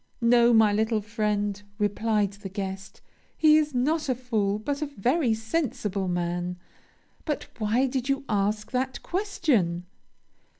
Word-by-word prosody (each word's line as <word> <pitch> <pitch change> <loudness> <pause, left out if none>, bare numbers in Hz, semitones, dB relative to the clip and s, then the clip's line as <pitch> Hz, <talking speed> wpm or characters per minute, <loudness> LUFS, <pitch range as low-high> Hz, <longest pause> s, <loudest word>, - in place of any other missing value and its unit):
'No, 235 0 +5
my 220 -3 +5
little 220 +1 +1
friend,' 205 -2 -1 0.2
replied 210 0 +1
the 200 -1 -8
guest, 195 0 -6 0.4
'he 310 -1 +6
is 300 -3 0
not 300 +4 +1
a 255 - +2
fool, 220 -5 0
but 280 +7 -3
a 300 - -1
very 255 - +1
sensible 220 - -2
man. 175 0 -2 0.7
But 300 -3 -2
why 225 +5 +2
did 260 0 -2
you 275 0 0
ask 210 +1 0
that 260 +1 -2
question?' 265 - 0
220 Hz, 135 wpm, -26 LUFS, 205-265 Hz, 0.7 s, he